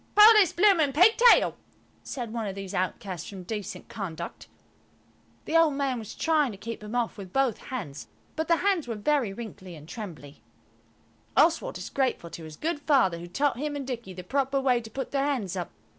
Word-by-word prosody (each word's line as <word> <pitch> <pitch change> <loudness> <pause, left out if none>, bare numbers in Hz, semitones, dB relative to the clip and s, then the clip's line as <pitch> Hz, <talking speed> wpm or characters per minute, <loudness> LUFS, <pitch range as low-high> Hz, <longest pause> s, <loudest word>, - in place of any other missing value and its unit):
"Pull 425 +2 +9
his 385 -6 +5
bloomin' 345 -7 +4
pigtail," 445 - +6 0.5
said 240 -5 -6
one 230 -3 -2
of 195 - -5
these 195 0 -7
outcasts 185 0 -3
from 190 -3 -8
decent 210 +1 -6
conduct. 170 -5 -6 1.0
The 320 - -3
old 325 -3 +5
man 275 -3 -1
was 220 -1 -8
trying 305 -5 +2
to 200 - -9
keep 230 +3 -6
them 210 +2 -7
off 235 -3 -1
with 190 -2 -9
both 270 -3 +1
hands, 180 - -6 0.3
but 315 0 -2
the 335 - +5
hands 365 -5 +1
were 230 - -3
very 250 0 +1
wrinkled 195 -3 -9
and 155 -3 -11
trembly. 165 - -9 1.0
Oswald 335 +9 +3
is - - -7
grateful 260 -11 -1
to 165 - -8
his 155 -1 -10
good 320 -1 -2
Father 265 - +2
who 175 - -8
taught 270 +8 0
him 295 0 -2
and 280 -2 -4
Dicky 240 -6 -5
the 180 - -7
proper 275 +6 0
way 255 -3 +2
to 225 - -10
put 265 +3 -5
their 275 -1 +1
hands 250 -11 -1
up. 180 -2 -4
240 Hz, 195 wpm, -27 LUFS, 195-290 Hz, 1.0 s, Pull